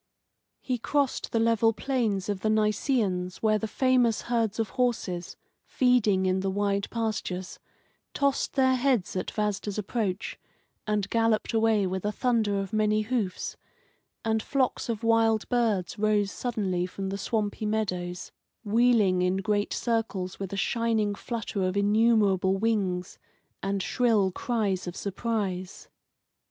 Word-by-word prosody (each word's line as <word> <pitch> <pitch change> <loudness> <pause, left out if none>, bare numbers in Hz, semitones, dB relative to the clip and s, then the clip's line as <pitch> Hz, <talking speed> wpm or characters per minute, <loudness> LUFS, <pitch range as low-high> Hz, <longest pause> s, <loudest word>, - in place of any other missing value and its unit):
He 250 -2 -2
crossed 280 +3 0
the - - 0
level 225 0 +3
plains 220 -7 -1
of 205 -2 -2
the 215 - 0
Nisaeans, 210 -4 0
where 215 -1 +3
the 220 - -3
famous 250 -1 +2
herds 230 -3 0
of 225 -3 -1
horses, 210 -9 -2 0.3
feeding 220 -7 +2
in 185 0 +2
the 195 0 -1
wide 200 0 0
pastures, 210 -5 -3 0.6
tossed 280 -1 +1
their 260 -1 +3
heads 250 -8 +1
at 185 - -2
Vasda's 210 -1 -2
approach, 205 -2 -2 0.5
and 210 -2 0
galloped 225 -1 +1
away 220 -2 +3
with 185 0 -3
a 210 - 0
thunder 220 -4 +1
of 195 0 -5
many 215 0 +2
hoofs, 215 -4 -2 0.7
and 220 0 +1
flocks 260 0 -1
of 230 -1 -3
wild 225 -1 +3
birds 215 -6 0
rose 210 -1 +2
suddenly 195 -7 -2
from 195 +1 -5
the 195 - -3
swampy 215 0 -2
meadows, 180 -5 -2 0.3
wheeling 215 -4 +3
in 180 +1 +1
great 205 +1 0
circles 220 -6 -2
with 195 -2 -5
a 200 - -4
shining 225 -1 +1
flutter 215 -2 -4
of 185 +1 0
innumerable 205 -3 +3
wings 195 -4 -1 0.4
and 195 -1 -1
shrill 215 -1 +2
cries 200 -4 -1
of 175 - -5
surprise. 195 -3 -3
210 Hz, 140 wpm, -27 LUFS, 195-230 Hz, 0.7 s, level